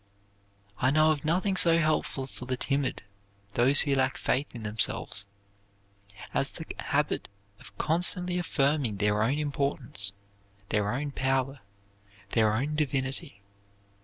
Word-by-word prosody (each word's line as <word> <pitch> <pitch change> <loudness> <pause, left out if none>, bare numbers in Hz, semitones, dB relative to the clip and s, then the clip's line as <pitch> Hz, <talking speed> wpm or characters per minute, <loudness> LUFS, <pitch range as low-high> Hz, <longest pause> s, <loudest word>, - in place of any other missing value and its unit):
I 130 - +3
know 155 +2 +4
of 145 -3 -2
nothing 185 +5 +1
so 165 -2 +5
helpful 155 -4 0
for 125 -1 -9
the 130 0 -1
timid, 140 -1 -1 0.5
those 130 +6 +5
who 140 - +1
lack 135 0 +1
faith 135 0 -1
in 115 - -7
themselves, 105 -1 +1 1.1
as - - +1
the - - -9
habit - - -1 0.3
of - - -15
constantly 180 +2 +2
affirming 140 - 0
their 105 +1 +1
own 130 +6 +1
importance, 140 -8 0 0.6
their 105 -1 0
own 140 +3 -3
power, 135 0 -1 0.7
their 110 -2 +3
own 135 +8 -1
divinity. 135 -8 -2
135 Hz, 130 wpm, -28 LUFS, 120-150 Hz, 1.1 s, so